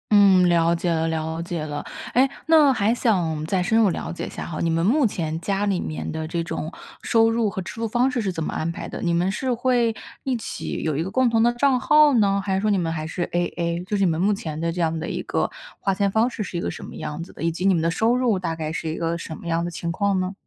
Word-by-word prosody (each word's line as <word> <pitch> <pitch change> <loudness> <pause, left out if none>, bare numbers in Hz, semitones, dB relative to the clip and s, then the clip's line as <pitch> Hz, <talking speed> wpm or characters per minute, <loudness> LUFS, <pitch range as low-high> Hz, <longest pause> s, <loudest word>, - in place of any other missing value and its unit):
嗯， 190 -3 +6
了 170 0 +3
解 170 +1 -1
了 160 0 +1
了 160 0 -2
解 170 -2 -4
了。 145 -1 -5 0.3
哎， 265 +2 +4 0.2
那 310 -4 +6
还 220 -1 +2
想 175 -10 0
再 180 +2 0
深 220 +5 +2
入 215 -3 +5
了 - - -4
解 175 - -5
一 - - -6
下 - - -6
哈， 160 -2 -5
你 170 - +1
们 165 +1 +1
目 260 +5 +4
前 160 -5 -3
家 200 +3 -1
里 195 -3 +1
面 155 - -4
的 160 0 -4
这 170 +1 -2
种 160 -1 -4 0.3
收 225 -1 +3
入 225 -2 +1
和 190 - -4
支 175 - -7
出 230 0 -2
方 245 +4 +2
式 250 -2 -1
是 200 - -1
怎 160 - -3
么 - - -3
安 160 - -2
排 - - -7
的？ - - -6
你 170 -1 +1
们 175 +3 +1
是 255 +5 -1
会 240 -2 +1 0.3
一 265 -2 0
起 225 - -5
有 155 -3 -1
一 160 - 0
个 185 - -4
共 255 +4 +2
同 225 -1 +2
的 240 +1 +4
账 255 +1 +2
号 300 +2 +5
呢？ 200 -4 +3
还 190 -1 0
是 - - +1
说 215 - +1
你 200 - +3
们 165 -3 -1
还 155 -1 -3
是 175 +2 -3
AA？ 175 0 -1
就 210 +2 -2
是 200 - +2
你 180 - +3
们 160 - -2
目 200 +4 +3
前 155 -6 -5
的 165 +1 -1
这 175 - -2
样 165 -1 0
的 165 - -4
一 - - -3
个 - - -1 0.3
花 195 - 0
钱 200 +1 +1
方 220 +4 +3
式 230 -3 -4
是 180 - -5
一 - - -2
个 - - -2
什 - - -7
么 - - -9
样 150 +2 -5
子 175 - -12
的？ - - -12
以 165 - +2
及 170 +3 -3
你 195 - +5
们 165 - +1
的 165 - +1
收 220 +7 +2
入 245 -5 +2
大 180 -3 -2
概 160 -1 -4
是 165 - -3
一 155 - -3
个 170 0 -1
什 160 -2 -7
么 - - -10
样 165 0 0
的 175 - -3
情 170 0 -4
况 200 +1 +1
呢？ 185 +1 -2
185 Hz, 320 characters per minute, -23 LUFS, 165-225 Hz, 0.3 s, 嗯